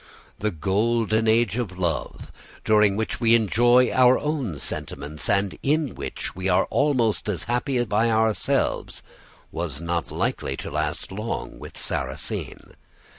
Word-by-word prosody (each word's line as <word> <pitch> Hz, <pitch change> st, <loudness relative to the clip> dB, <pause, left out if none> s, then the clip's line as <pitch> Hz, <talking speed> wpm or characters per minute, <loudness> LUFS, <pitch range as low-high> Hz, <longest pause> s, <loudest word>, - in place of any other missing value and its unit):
The 105 Hz, -, 0 dB
golden 110 Hz, +5 st, +1 dB
age 115 Hz, -1 st, +3 dB
of 100 Hz, -7 st, -3 dB
love, 85 Hz, -4 st, -3 dB, 0.3 s
during 105 Hz, -2 st, +4 dB
which 110 Hz, +1 st, -2 dB
we 115 Hz, 0 st, +5 dB
enjoy 120 Hz, +3 st, +4 dB
our 130 Hz, 0 st, +5 dB
own 140 Hz, -, -2 dB
sentiments, 75 Hz, +2 st, -3 dB
and 100 Hz, -1 st, +1 dB
in 150 Hz, -1 st, +1 dB
which -, -, -5 dB
we 95 Hz, +1 st, -2 dB
are 90 Hz, -, +3 dB
almost 125 Hz, -8 st, +1 dB
as 90 Hz, -5 st, -1 dB
happy 120 Hz, +1 st, 0 dB
by 110 Hz, +2 st, +1 dB
ourselves, 110 Hz, -1 st, 0 dB, 0.5 s
was 80 Hz, -5 st, -3 dB
not 85 Hz, 0 st, -2 dB
likely -, -, -2 dB
to -, -, -6 dB
last -, -, -2 dB
long 105 Hz, +4 st, -5 dB
with -, -, -10 dB
Sarrasine. -, -, -4 dB
110 Hz, 135 wpm, -24 LUFS, 95-120 Hz, 0.5 s, we